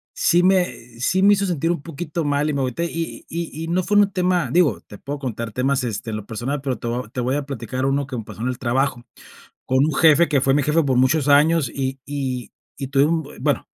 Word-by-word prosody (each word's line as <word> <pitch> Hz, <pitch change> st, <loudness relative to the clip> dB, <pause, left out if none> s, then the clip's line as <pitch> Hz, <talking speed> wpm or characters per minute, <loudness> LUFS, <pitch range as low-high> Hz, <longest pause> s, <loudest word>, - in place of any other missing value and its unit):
sí 175 Hz, +1 st, +3 dB
me 180 Hz, -11 st, 0 dB
sí 185 Hz, +9 st, +1 dB
me 205 Hz, +1 st, +6 dB
hizo 200 Hz, 0 st, +1 dB
sentir 165 Hz, -3 st, -1 dB
un 170 Hz, -, -2 dB
poquito 165 Hz, 0 st, -4 dB
mal 145 Hz, +1 st, +1 dB
y -, -, -1 dB
me 140 Hz, -, -1 dB
agüité, 130 Hz, +6 st, -1 dB
y 165 Hz, -1 st, -5 dB
y 170 Hz, 0 st, -3 dB
y 160 Hz, +2 st, -6 dB
y -, -, -7 dB
no 180 Hz, +2 st, 0 dB
fue 205 Hz, +3 st, +1 dB
un 205 Hz, -1 st, +4 dB
tema, 180 Hz, -2 st, +1 dB
digo, 150 Hz, -, +2 dB
te 105 Hz, -, -13 dB
puedo 145 Hz, +5 st, -6 dB
contar 115 Hz, -4 st, -4 dB
temas, 135 Hz, +3 st, 0 dB
este, 115 Hz, -1 st, -4 dB
en 110 Hz, -, -3 dB
lo 105 Hz, -, -8 dB
personal, 120 Hz, +6 st, -3 dB
pero 135 Hz, -3 st, -3 dB
te 120 Hz, -, -5 dB
voy 120 Hz, 0 st, -3 dB
te 125 Hz, -, -2 dB
voy 130 Hz, +3 st, 0 dB
a 145 Hz, -, -2 dB
platicar 130 Hz, -1 st, -4 dB
uno 140 Hz, 0 st, 0 dB
que 130 Hz, -2 st, -5 dB
me 110 Hz, -, -4 dB
pasó 110 Hz, -, -10 dB
en 125 Hz, -, -1 dB
el 125 Hz, -1 st, -2 dB
trabajo 130 Hz, 0 st, -1 dB, 0.6 s
con 130 Hz, -, +1 dB
un 155 Hz, -, -1 dB
jefe, 160 Hz, +2 st, +5 dB
que 140 Hz, -4 st, +2 dB
fue 135 Hz, 0 st, +3 dB
mi 145 Hz, 0 st, +2 dB
jefe 150 Hz, +4 st, +2 dB
por 130 Hz, -3 st, +1 dB
muchos 135 Hz, +3 st, +3 dB
años, 150 Hz, -1 st, +4 dB
y 135 Hz, 0 st, -3 dB
y 130 Hz, -5 st, -4 dB, 0.3 s
y 135 Hz, -, -4 dB
tuve 140 Hz, +1 st, +3 dB
un 165 Hz, +1 st, +1 dB
bu 145 Hz, -, -12 dB
bueno, 140 Hz, 0 st, 0 dB
140 Hz, 260 wpm, -21 LUFS, 125-165 Hz, 0.6 s, me